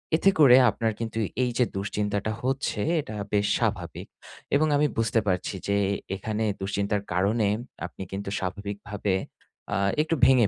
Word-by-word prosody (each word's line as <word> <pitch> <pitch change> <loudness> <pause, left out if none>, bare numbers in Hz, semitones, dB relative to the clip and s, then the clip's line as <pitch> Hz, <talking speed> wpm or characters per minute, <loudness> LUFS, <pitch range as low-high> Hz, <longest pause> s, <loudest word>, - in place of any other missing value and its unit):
এতে 190 +4 +4
করে 130 -4 +9
আপনার 110 +1 0
কিন্তু 115 -1 -4 0.3
এইযে 125 0 +2
দুশ্চিন্তাটা 105 +1 -1
হচ্ছে, 130 -4 -1 0.2
এটা 110 -6 -8 0.2
বেশ 105 0 +3
স্বাভাবিক। - - -2 0.5
এবং 155 +2 +4
আমি 150 +1 +3
বুঝতে 115 0 +2
পারছি 90 +1 0
যে 100 - +2 0.2
এ - - 0 0.2
এখানে 110 +2 -2 0.2
দুশ্চিন্তার 100 +1 -1
কারণে 100 +4 +2 0.4
আপনি 90 +2 -7
কিন্তু 100 0 -4
স্বাভাবিকভাবে 100 +1 -3 0.6
আ - - +1 0.2
একটু 160 +1 0
ভেঙে 130 -5 +6
105 Hz, 145 wpm, -26 LUFS, 100-120 Hz, 0.6 s, করে